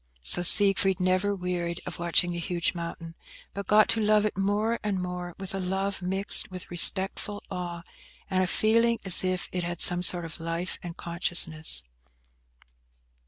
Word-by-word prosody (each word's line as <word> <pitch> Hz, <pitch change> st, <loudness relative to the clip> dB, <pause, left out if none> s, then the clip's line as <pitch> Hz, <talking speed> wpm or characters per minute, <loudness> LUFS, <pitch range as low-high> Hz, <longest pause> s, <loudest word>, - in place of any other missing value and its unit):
So 60 Hz, -, +2 dB
Siegfried 195 Hz, 0 st, +4 dB
never 185 Hz, +2 st, 0 dB
wearied 180 Hz, -2 st, -5 dB
of -, -, -8 dB
watching 175 Hz, +1 st, +1 dB
the 175 Hz, -, -5 dB
huge 170 Hz, 0 st, -2 dB
mountain, 170 Hz, -1 st, -8 dB, 0.4 s
but 200 Hz, -1 st, -7 dB
got 210 Hz, 0 st, +4 dB
to 225 Hz, -, +1 dB
love 210 Hz, 0 st, +2 dB
it 210 Hz, -, -3 dB
more 205 Hz, +4 st, -2 dB
and 205 Hz, -3 st, -3 dB
more, 180 Hz, -1 st, -7 dB
with 195 Hz, -1 st, -8 dB
a 195 Hz, -, -4 dB
love 190 Hz, +2 st, -4 dB
mixed 190 Hz, +3 st, +1 dB
with 185 Hz, -2 st, -10 dB
respectful 190 Hz, +3 st, +1 dB
awe, 175 Hz, -2 st, -7 dB, 0.4 s
and 185 Hz, -2 st, -1 dB
a -, -, -2 dB
feeling 230 Hz, +4 st, +1 dB
as 190 Hz, -1 st, +8 dB
if 185 Hz, -1 st, -3 dB
it 180 Hz, -1 st, -4 dB
had 175 Hz, 0 st, -6 dB
some 175 Hz, 0 st, +4 dB
sort 175 Hz, -1 st, +3 dB
of 165 Hz, -, -10 dB
life 165 Hz, +2 st, -5 dB
and 175 Hz, -1 st, -10 dB
consciousness. 165 Hz, -, +2 dB
180 Hz, 165 wpm, -25 LUFS, 175-200 Hz, 0.4 s, as